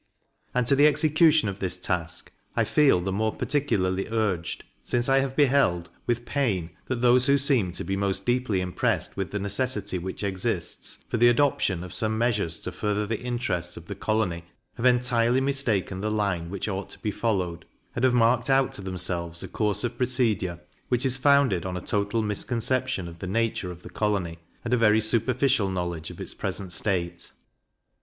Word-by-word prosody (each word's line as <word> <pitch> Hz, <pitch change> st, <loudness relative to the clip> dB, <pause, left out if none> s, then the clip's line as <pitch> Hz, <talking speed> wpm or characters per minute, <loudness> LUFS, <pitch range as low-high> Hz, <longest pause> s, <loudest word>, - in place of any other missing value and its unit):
And 125 Hz, -1 st, +2 dB
to 140 Hz, -, +4 dB
the 145 Hz, +2 st, +6 dB
execution 155 Hz, -1 st, +4 dB
of 100 Hz, 0 st, -4 dB
this 90 Hz, -1 st, -1 dB
task 90 Hz, -2 st, -3 dB, 0.2 s
I -, -, +3 dB
feel 140 Hz, -12 st, +4 dB
the 95 Hz, +2 st, -2 dB
more 110 Hz, +3 st, -1 dB
particularly 95 Hz, -10 st, 0 dB
urged, 100 Hz, -7 st, -1 dB, 0.2 s
since 120 Hz, 0 st, -1 dB
I 135 Hz, 0 st, +4 dB
have 135 Hz, -1 st, -2 dB
beheld, 130 Hz, -, +2 dB, 0.2 s
with 120 Hz, 0 st, 0 dB
pain, 105 Hz, -, -1 dB, 0.2 s
that 125 Hz, -2 st, -2 dB
those 125 Hz, +1 st, +5 dB
who 140 Hz, 0 st, +5 dB
seem 130 Hz, -9 st, +2 dB
to -, -, -2 dB
be 95 Hz, -, -2 dB
most 100 Hz, 0 st, -1 dB
deeply 120 Hz, -6 st, +1 dB
impressed 90 Hz, -1 st, -1 dB
with 95 Hz, -1 st, -3 dB
the 105 Hz, -, -3 dB
necessity 100 Hz, 0 st, -1 dB
which 95 Hz, +4 st, -5 dB
exists, 95 Hz, -2 st, -3 dB
for -, -, -1 dB
the 120 Hz, +1 st, +6 dB
adoption 120 Hz, -8 st, +2 dB
of 90 Hz, -, -8 dB
some 110 Hz, 0 st, +1 dB
measures 105 Hz, -8 st, 0 dB
to 90 Hz, -, -4 dB
further 105 Hz, +2 st, -1 dB
the 110 Hz, +1 st, -3 dB
interests 120 Hz, -9 st, -2 dB
of 85 Hz, -, -10 dB
the 100 Hz, -, -5 dB
colony, 100 Hz, -4 st, -1 dB, 0.3 s
have 120 Hz, +2 st, +1 dB
entirely 125 Hz, 0 st, +3 dB
mistaken 125 Hz, -9 st, 0 dB
the 110 Hz, -, -1 dB
line 100 Hz, -6 st, -1 dB
which 100 Hz, +2 st, -4 dB
ought 95 Hz, -2 st, -4 dB
to -, -, -10 dB
be 105 Hz, -, -2 dB
followed, 95 Hz, -6 st, -2 dB, 0.3 s
and 120 Hz, -, -2 dB
have 130 Hz, -, +5 dB
marked 120 Hz, +3 st, +3 dB
out 135 Hz, -1 st, +3 dB
to -, -, -5 dB
themselves 90 Hz, -2 st, -3 dB
a -, -, -5 dB
course 105 Hz, +4 st, -1 dB
of 120 Hz, 0 st, -3 dB
procedure, 115 Hz, -9 st, 0 dB, 0.3 s
which 125 Hz, +1 st, +1 dB
is 130 Hz, -1 st, +3 dB
founded 135 Hz, -, +3 dB
on 90 Hz, -1 st, -3 dB
a -, -, -2 dB
total 105 Hz, +4 st, -1 dB
misconception 120 Hz, 0 st, -1 dB
of 85 Hz, 0 st, -11 dB
the 95 Hz, -, -5 dB
nature 110 Hz, -2 st, -1 dB
of 90 Hz, 0 st, -9 dB
the -, -, -9 dB
colony, 95 Hz, -6 st, -1 dB, 0.3 s
and 120 Hz, -, -1 dB
a -, -, +4 dB
very 110 Hz, -1 st, +4 dB
superficial 115 Hz, 0 st, +2 dB
knowledge 85 Hz, -4 st, -3 dB
of -, -, -11 dB
its -, -, -5 dB
present 95 Hz, -3 st, -4 dB
state. 85 Hz, -3 st, -2 dB
105 Hz, 190 wpm, -26 LUFS, 95-125 Hz, 0.3 s, the